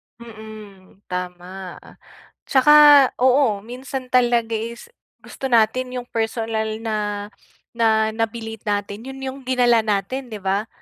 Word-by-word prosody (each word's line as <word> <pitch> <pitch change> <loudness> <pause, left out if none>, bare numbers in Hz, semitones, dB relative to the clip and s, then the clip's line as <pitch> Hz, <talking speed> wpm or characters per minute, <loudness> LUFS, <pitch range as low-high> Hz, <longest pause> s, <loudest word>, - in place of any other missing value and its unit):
Mm. 215 -4 -13
Tama. 180 0 -6 0.7
Tsaka 270 +2 +3 0.5
oo, 255 -5 +3
minsan 255 +2 -7
talaga 240 -2 +2
is, 235 - -7 0.4
gusto 270 - -6
natin 250 +2 +2
'yong 245 0 -6
personal 225 -1 -2
na 210 -2 -3 0.4
na 220 -2 +2
nabili 225 0 -4
natin, 205 +2 -3
'yon 270 0 -8
'yong 265 0 -5
dinala 245 -2 +3
natin, 215 +6 -2
'di 215 -3 -8
ba? 200 +3 -1
225 Hz, 115 wpm, -21 LUFS, 205-245 Hz, 0.7 s, Tsaka